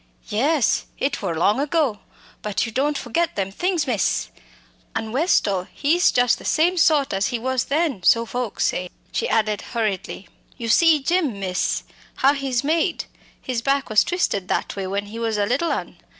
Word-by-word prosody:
"Yes, 275 +6 +1
it 275 - -1
wor 180 -5 -2
long 205 +8 +2
ago, 285 -7 0 0.4
but 210 +2 -1
you 225 - -6
don't 285 +5 0
forget 300 +8 -1
them 195 -1 -2
things, 350 - 0
miss! 225 -8 0 0.7
An' 220 -1 -3
Westall, 210 - +1
he's 335 +5 +2
just 245 -1 +2
the - - -12
same 340 +4 +2
sort 305 - +3
as 195 0 +1
he 245 - -2
was 255 +1 -1
then, 290 - 0
so 230 +6 +4
folks 245 -1 -2
say," 180 0 -1 0.2
she - - -1
added 215 -2 +1
hurriedly. 200 -5 -3 0.3
"You 230 -2 -4
see 310 +4 +5
Jim, 310 - 0
miss, 185 -1 -1 0.3
how 275 +2 +4
he's 270 -3 -1
made? 325 +4 0 0.3
His 250 -3 -3
back 275 -1 0
was 215 - +5
twisted 205 - -1
that - - -2
way 195 -1 -3
when 200 +2 -2
he 220 +3 -8
was 225 -2 -1
a 205 - +2
little 275 +10 0
un. - - -4
245 Hz, 180 wpm, -22 LUFS, 210-295 Hz, 0.7 s, see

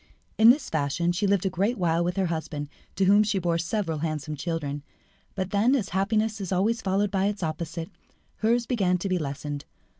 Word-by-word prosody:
In 220 +1 +9
this 265 +2 +4
fashion 155 +3 0
she 195 +4 0
lived 195 -1 +2
a - - +3
great 200 +8 0
while 170 -2 +1
with 175 +1 -1
her 190 - +2
husband, 160 -3 -3 0.3
to 195 - +2
whom 200 +2 +6
she 210 -1 +1
bore 170 -2 0
several 170 -2 -2
handsome 155 -1 -3
children; 145 -1 -3 0.5
but 190 -1 -3
then, 225 +7 +3
as 220 -8 -1
happiness 215 +3 0
is 190 - -4
always 215 +5 +1
followed 195 0 +1
by 195 0 +1
its 205 -2 -3
opposite, 165 +1 -4 0.5
hers 235 +2 +2
began 195 -8 +1
to 180 - -3
be 185 -1 +1
lessened. 145 -1 -4
185 Hz, 200 wpm, -26 LUFS, 165-205 Hz, 0.5 s, In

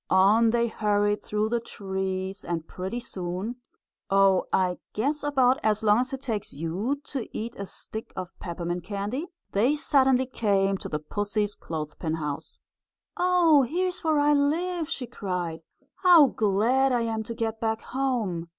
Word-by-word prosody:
On 205 +5 +5
they 235 +1 +2
hurried 205 -2 +1
through 210 +1 -1
the 235 +1 +1
trees, 190 -3 -4
and 165 -2 -3
pretty 190 +6 -4
soon 190 +1 -4 0.5
Oh, 195 -1 +4
I 180 -1 +1
guess 285 +8 0
about 265 -3 +3
as 215 0 +1
long 210 +1 +5
as 255 +1 -1
it 265 -1 -5
takes 225 -7 -2
you 185 - -2
to 265 -5 -5
eat 230 +2 -5
a 200 - -6
stick 220 +4 -7
of 185 -1 -5
peppermint 175 0 -4
candy 205 - -3 0.2
they 240 +9 +3
suddenly 265 -3 +3
came 195 -6 +1
to - - -6
the 150 - -1
pussy's 205 +6 -1
clothespin 160 -1 -4
house. 150 -3 -4 0.6
"Oh, 355 -5 +5
here's 355 +8 -1
where 315 -2 +2
I 290 0 +4
live!" 325 +4 0
she 265 - -3
cried. 180 -8 -4 0.4
"How 350 -5 +7
glad 240 +4 +2
I 245 -1 +2
am 225 -1 -1
to 230 +1 -6
get 225 -1 -2
back 220 -1 0
home!" 230 -11 -2
220 Hz, 160 wpm, -26 LUFS, 190-260 Hz, 0.6 s, How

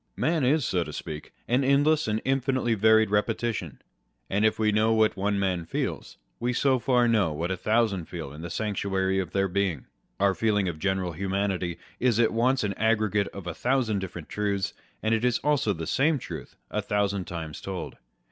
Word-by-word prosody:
Man 160 -2 +1
is 140 +2 +3
(so 90 -2 +1
to - - -8
speak) 75 0 -7 0.2
an 125 +3 +2
endless 145 +2 +3
and 110 0 -1
infinitely 130 -2 +1
varied 110 0 +4
repetition: 105 - -1 0.5
and 100 +2 +1
if 110 - +3
we 110 -1 +2
know 110 +2 +3
what 110 -1 +3
one 100 +1 0
man 95 -3 0
feels, 80 - -4 0.2
we 120 +1 0
so 130 0 +2
far 125 -1 +3
know 105 -8 +3
what 85 +4 -2
a - - 0
thousand 105 -2 +1
feel 80 -6 -7
in 75 - -9
the 85 - -5
sanctuary 95 -2 -1
of 90 -3 -2
their 95 +1 +1
being. 95 -6 -1 0.3
Our 100 0 +3
feeling 105 -1 +1
of 80 -3 -4
general 95 -1 0
humanity 95 0 -2 0.2
is 120 -3 +2
at 115 - +3
once 125 +3 +2
an 100 -1 -1
aggregate 110 -2 +2
of 100 -3 -9
a 90 - -3
thousand 120 -2 +1
different 90 -4 -7
truths, 100 -2 -1 0.3
and 110 +1 +2
it 115 +1 +1
is 125 -1 +3
also 145 -7 +2
the 80 -4 -4
same 145 - +2
truth - - -8 0.2
a - - 0
thousand 100 -2 0
times 80 -3 -6
told. 95 -4 -5
105 Hz, 195 wpm, -27 LUFS, 95-120 Hz, 0.5 s, varied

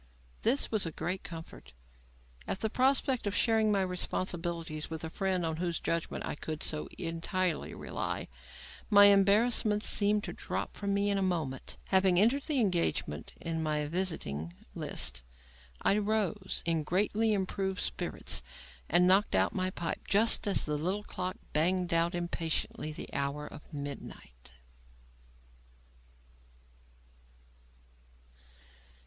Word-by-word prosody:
This 255 +5 +2
was 215 -6 +1
a - - -4
great 180 +4 -3
comfort. 165 - -10 0.7
At 190 - -3
the 220 - 0
prospect 260 -2 +2
of 205 - -1
sharing 220 -2 +4
my 200 -2 +2
responsibilities 170 -3 -2
with 160 -1 -5
a 160 - -5
friend 185 -2 0
on 160 -1 -2
whose 170 -1 -1
judgment 165 -1 -2
I - - -3
could 155 +1 -5
so 155 -1 0
entirely 170 +1 -2
rely, - - -3 0.6
my 205 -2 +8
embarrassments 205 +2 +4
seemed 205 0 +4
to - - -5
drop - - -4
from 200 -1 -1
me 200 0 +2
in 200 - +1
a - - -1
moment. 160 -8 -2
Having 190 -2 +4
entered 240 +8 +4
the 300 -4 +1
engagement 170 - 0
in 165 -1 -3
my 150 -1 0
visiting 145 - -2 0.2
list, - - -1 0.6
I 200 - +3
rose, 205 -2 -1
in 165 -1 +2
greatly 210 +7 +1
improved 190 -1 -1
spirits, - - -1 0.5
and 175 +3 +5
knocked 195 +4 +4
out - - +2
my 185 -1 0
pipe 170 -2 -4
just 215 +2 +3
as 200 - +2
the 150 -1 -1
little 190 +6 -1
clock 185 -2 -4 0.2
banged 175 +3 +1
out 170 +2 +2
impatiently 165 -2 -2
the 150 - -8
hour 140 +1 -2
of 150 - -12
midnight. 140 - -8
185 Hz, 130 wpm, -31 LUFS, 160-205 Hz, 0.7 s, my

